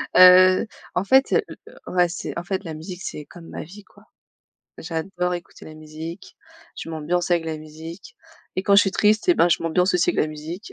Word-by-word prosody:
Heu 185 +3 +7 0.3
en 180 - +1
fait, 265 +6 +4
le 445 - +3 0.2
le - - -14 0.2
ouais 175 -1 +4
c'est 180 - -6
en 170 - -4
fait 190 +2 -3
la 165 -2 -6
musique 175 +4 -8
c'est 150 - -6
comme 170 -2 -14
ma - - -6
vie, 200 +6 -13
quoi. - - -22 0.7
J'adore 180 +2 -3
écouter 175 - -10
la 155 - -11
musique, 155 +3 -9 0.4
je - - -7
m'ambiance 165 +3 -2
avec 170 -2 +2
la 160 -1 -4
musique 160 +4 -11 0.4
et 185 - 0
quand 200 - +3
je 205 - +9
suis 195 - 0
triste, 215 - +2
et 355 - +6
ben 175 - +4
je - - +1
m'ambiance 180 +3 +1
aussi 180 - +3
avec - - -6
de - - +4
la 155 - -2
musique. 155 +6 -8
175 Hz, 220 wpm, -22 LUFS, 160-185 Hz, 0.7 s, je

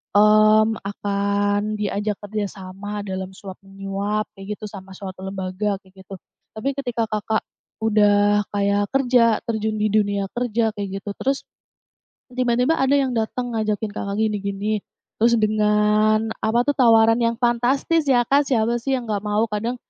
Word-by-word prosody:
mmm, 215 +1 +5
akan 205 +1 -1
diajak 205 0 -2
kerja 205 0 -3
sama 195 +2 -7
dalam 190 -1 -5
suap-menyuap, 195 +1 -5
kayak 195 +2 -6
gitu, 215 - -7
sama 195 -2 -11
suatu 190 -1 -8
lembaga, 190 +1 -3
kayak 190 -1 -18
gitu. 195 - -8 0.4
Tapi 270 +5 -2
ketika 240 -4 -2
Kakak 215 0 -1 0.4
udah 205 -1 +3
kayak 200 0 0
kerja, 245 -4 +3
terjun 220 -1 -1
di 215 - +2
dunia 200 -2 +1
kerja 230 -2 0
kayak 195 -1 -4
gitu. 205 - -5
Terus, 270 +1 -1 0.9
tiba-tiba 250 +4 +1
ada 270 +1 +3
yang 270 -2 +1
datang, 240 +2 -2
ngajakin 215 -1 -1
Kakak 200 -1 -4
gini-gini, 210 0 -1 0.4
terus 235 +1 +4
dengan 215 +1 +2
apa 225 +2 +2
tuh 290 - +2
tawaran 225 +1 +5
yang 230 0 +1
fantastis 260 +6 +1
ya 245 -3 +4
Kak, 280 +1 +3
siapa 235 -1 +1
sih 270 +3 -1
yang 245 - -6
nggak 205 -1 -2
mau? 210 +2 +2
Kadang, 225 +4 -2
215 Hz, 150 wpm, -22 LUFS, 200-230 Hz, 0.9 s, mmm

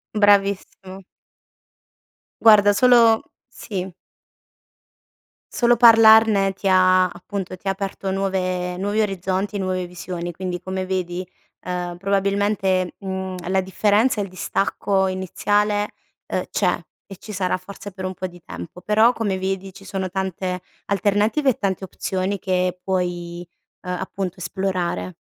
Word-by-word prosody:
Bravissimo. 200 -2 +1 1.4
Guarda 205 -2 +7
solo 230 0 +5 0.3
sì. 190 -6 -6 1.6
Solo 240 0 +4
parlarne 220 -4 +7
ti 195 +1 -4
ha 185 -1 +5
appunto 190 0 -6
ti 195 - -10
ha - - +3
aperto 195 0 -4
nuove 185 -2 -1
nuovi 205 +3 0
orizzonti, 195 0 -2
nuove 185 -1 -1
visioni. 175 0 -6
Quindi 180 0 -4
come 185 +1 -4
vedi, 185 -1 -2 0.4
ehm, 180 -1 -4
probabilmente, 195 -1 0
mhmm, 190 -1 -4
la 190 0 +2
differenza 210 +5 +2
e - - +1
il 195 - -7
distacco 190 +1 0
iniziale, 205 +3 0 0.4
uhm, - - -2
c'è - - +1 0.3
e 195 - -11
ci 215 - -10
sarà 185 -1 0
forse 200 +2 -10
per 185 0 -8
un 185 0 -4
po' 185 - -5
di 175 -1 -9
tempo; 85 - -9
però 220 +5 +4
come 205 -5 -1
vedi, 190 0 -3
ci 195 - -14
sono 190 -1 -3
tante 185 -1 -3 0.3
alternative 205 - +1
e 255 - 0
tante 195 -2 -1
opzioni 190 +1 -3
che 185 -1 -1
puoi, 175 -2 -3 0.4
ehm, 180 - -4
appunto 190 0 -4
esplorare. 180 - -3
190 Hz, 130 wpm, -22 LUFS, 185-205 Hz, 1.6 s, Guarda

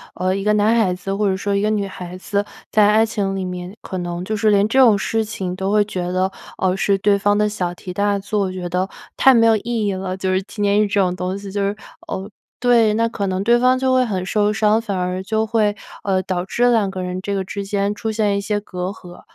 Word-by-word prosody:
呃， 185 +1 0
一 195 - -3
个 210 - +2
男 210 +2 +3
孩 220 -5 +3
子 180 +2 -4
或 200 0 +1
者 190 - 0
说 200 +1 -1
一 200 - +1
个 210 - +1
女 210 -2 0
孩 180 -1 -8
子， 200 +2 -1 0.3
在 210 -1 +5
爱 215 +2 +4
情 200 -3 -2
里 190 -1 -3
面 180 +1 -6
可 185 - -5
能 175 0 -4
就 215 - -2
是 215 0 +2
连 205 0 +4
这 260 +5 +2
种 230 -6 +6
事 225 +3 0
情 190 -4 -4
都 190 +1 -2
会 210 0 +3
觉 180 -3 -3
得， 185 +1 0 0.3
呃， 185 -1 +1
是 195 +1 +1
对 200 +1 +3
方 205 +1 +2
的 210 0 +2
小 190 -4 -2
题 180 +1 -8
大 200 +1 +1
作， 200 -1 -1
觉 185 -1 -5
得 180 +2 -1 0.3
太 265 0 +6
没 230 -1 +5
有 225 -1 +5
意 225 0 -2
义 200 - 0
了， 185 0 -4
就 190 0 -1
是 185 - +1
纪 205 +2 -6
念 205 +1 +3
日 - - 0
这 200 0 0
种 180 -2 +2
东 180 +1 -3
西， 200 -1 -8
就 200 +1 -2
是， 200 +1 0 0.3
呃 190 +1 -4 0.3
对， 235 -3 +4
那 230 +1 +2
可 205 -3 -3
能 190 0 -1
对 235 +3 +4
方 255 +1 +4
就 260 0 +1
会 255 0 +4
很 190 -6 -2
受 210 +1 +1
伤， 215 +1 +2
反 205 -4 -3
而 180 0 -2
就 220 +3 0
会， 215 -2 +1 0.3
呃， 190 -2 0
导 180 -2 -2
致 245 +5 +2
2 220 -4 +2
个 190 -1 -5
人 180 0 -4
这 200 +1 -3
个 195 - -1
之 200 +1 -5
间 200 0 -1
出 220 +1 -3
现 210 -2 +1
一 200 - -1
些 205 +1 -1
隔 180 -3 -6
阂， 180 -3 -11
200 Hz, 280 characters per minute, -20 LUFS, 185-215 Hz, 0.3 s, 种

